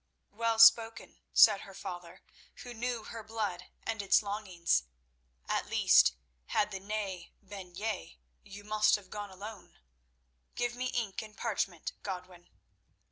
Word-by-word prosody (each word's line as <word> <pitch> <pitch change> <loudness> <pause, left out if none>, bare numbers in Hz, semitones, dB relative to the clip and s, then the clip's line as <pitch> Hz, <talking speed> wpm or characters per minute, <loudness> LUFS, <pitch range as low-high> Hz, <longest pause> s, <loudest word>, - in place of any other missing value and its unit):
"Well 230 +1 0
spoken," 225 0 +5
said 210 -3 +7
her 195 - -11
father, 175 -3 -8 0.4
who 245 -2 -8
knew 240 0 -3
her 225 +1 -7
blood 210 -5 -4 0.2
and 225 -2 -2
its 200 +2 +4
longings. 190 - 0 0.6
"At - - -1
least, - - +5 0.3
had 210 0 +1
the 195 - -4
'nay' 195 -3 -4
been 185 -3 -9
'yea,' 175 - -4 0.2
you 200 +1 -11
must 215 0 +3
have 200 -3 -9
gone 205 -1 -5
alone. 200 +2 -10 0.8
Give 240 0 -1
me 250 +1 -3
ink 230 -6 -2
and 215 -1 -12
parchment, 195 -7 -2
Godwin." 180 -2 -7
205 Hz, 135 wpm, -32 LUFS, 185-225 Hz, 0.8 s, said